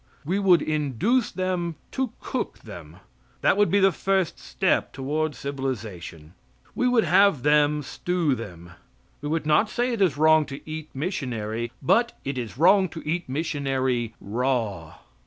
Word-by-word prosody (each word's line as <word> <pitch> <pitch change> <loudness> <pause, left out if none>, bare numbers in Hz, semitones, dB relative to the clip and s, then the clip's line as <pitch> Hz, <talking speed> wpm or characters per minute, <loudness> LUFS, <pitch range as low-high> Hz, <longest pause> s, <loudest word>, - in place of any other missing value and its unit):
We 185 +6 0
would 185 -4 +4
induce 155 - 0
them 180 -3 -2 0.2
to 265 -4 -2
cook - - -4
them. - - -10 0.5
That - - +4
would 205 0 +3
be 200 - +3
the 195 0 +5
first 190 0 0
step - - 0
toward 150 +2 -2
civilization. 110 - -5 0.4
We 250 - +1
would 245 -3 +4
have 185 -4 +4
them 150 0 +3
stew 170 +1 -1
them. 90 -8 -8 0.5
We 145 - -4
would 160 -1 -1
not 155 +8 +3
say 245 +2 -1
it 225 - -2
is 170 -8 +3
wrong 155 0 +5
to 140 +1 -9
eat 155 0 -6
missionary, 120 - -3
but 235 - +2
it 135 -1 -2
is 120 -1 -6
wrong 185 +4 +5
to 160 -1 -9
eat 170 -1 -2
missionary 130 -6 -1
raw. 110 -7 -2
150 Hz, 155 wpm, -25 LUFS, 130-185 Hz, 0.5 s, the